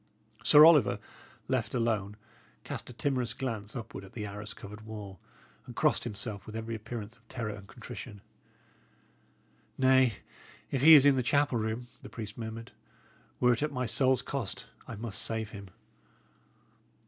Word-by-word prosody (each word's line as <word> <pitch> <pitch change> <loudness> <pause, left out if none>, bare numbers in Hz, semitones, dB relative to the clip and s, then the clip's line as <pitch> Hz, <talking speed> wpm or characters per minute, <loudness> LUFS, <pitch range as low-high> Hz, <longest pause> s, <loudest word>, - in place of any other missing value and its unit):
Sir 150 +1 +9
Oliver, 150 -11 +6 0.5
left - - -1
alone, 105 -4 0 0.5
cast - - -6
a - - -9
timorous 125 -1 -1
glance 115 -5 -4
upward 110 -5 -7
at 95 - -13
the 105 -3 -5
arras 105 +1 -7
covered 105 +1 -10
wall, 105 -4 -8 0.5
and - - -9
crossed - - +2
himself 105 -2 -5
with 110 - -8
every 115 +1 -4
appearance 110 0 -6
of 115 - -30
terror 115 -4 -4
and 100 -1 -11
contrition. 100 +1 -9 1.6
"Nay, 130 -2 +5 0.6
if 135 - 0
he 160 +3 +10
is 145 -2 +8
in 140 -2 +6
the - - +3
chapel 140 -1 +2
room," 110 +3 -2 0.2
the - - -10
priest 110 -2 -7
murmured, 115 0 -7 0.7
"were 125 -1 +5
it 120 - -3
at 150 0 0
my 125 -2 -2
soul's 130 +2 +3
cost, 130 -8 -4 0.2
I 115 - -6
must 110 0 -3
save 110 -1 -2
him." 100 -1 -9
115 Hz, 160 wpm, -30 LUFS, 105-130 Hz, 1.6 s, he